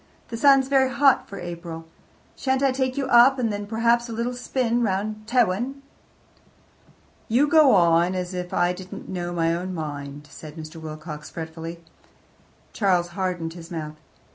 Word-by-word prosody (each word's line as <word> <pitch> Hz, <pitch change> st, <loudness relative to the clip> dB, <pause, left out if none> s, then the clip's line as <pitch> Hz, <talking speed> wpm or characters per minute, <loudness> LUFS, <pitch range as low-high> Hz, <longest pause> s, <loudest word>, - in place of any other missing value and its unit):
"The 230 Hz, -, -5 dB
sun's 275 Hz, 0 st, +5 dB
very 265 Hz, -1 st, +3 dB
hot 275 Hz, 0 st, +3 dB
for 200 Hz, -, -7 dB
April. 170 Hz, -2 st, -7 dB, 0.5 s
Shan't 265 Hz, 0 st, 0 dB
I 270 Hz, -, +4 dB
take 260 Hz, 0 st, -1 dB
you 275 Hz, -, 0 dB
up, 260 Hz, +1 st, +6 dB
and 230 Hz, -4 st, 0 dB
then, 205 Hz, 0 st, -5 dB
perhaps, 235 Hz, +2 st, +1 dB
a -, -, -5 dB
little 235 Hz, +2 st, -2 dB
spin 245 Hz, -1 st, -1 dB
round 215 Hz, +1 st, -2 dB
by -, -, -10 dB
Tewin?" 245 Hz, +4 st, +1 dB, 1.4 s
"You 255 Hz, +6 st, +3 dB
go 300 Hz, -6 st, +6 dB
on 170 Hz, 0 st, +4 dB
as 180 Hz, 0 st, -3 dB
if 180 Hz, 0 st, -5 dB
I 175 Hz, 0 st, +2 dB
didn't 185 Hz, +1 st, -9 dB
know 175 Hz, -2 st, -3 dB
my 165 Hz, -1 st, +1 dB
own 180 Hz, +2 st, -4 dB
mind," 145 Hz, -2 st, -6 dB
said 155 Hz, -1 st, -10 dB
Mr. 160 Hz, 0 st, -9 dB
Wilcox 155 Hz, -1 st, -8 dB
fretfully. 165 Hz, +1 st, -7 dB, 0.9 s
Charles 180 Hz, -4 st, +1 dB
hardened 175 Hz, -2 st, -3 dB
his 170 Hz, -1 st, -11 dB
mouth. 155 Hz, -3 st, -6 dB
185 Hz, 165 wpm, -24 LUFS, 170-245 Hz, 1.4 s, up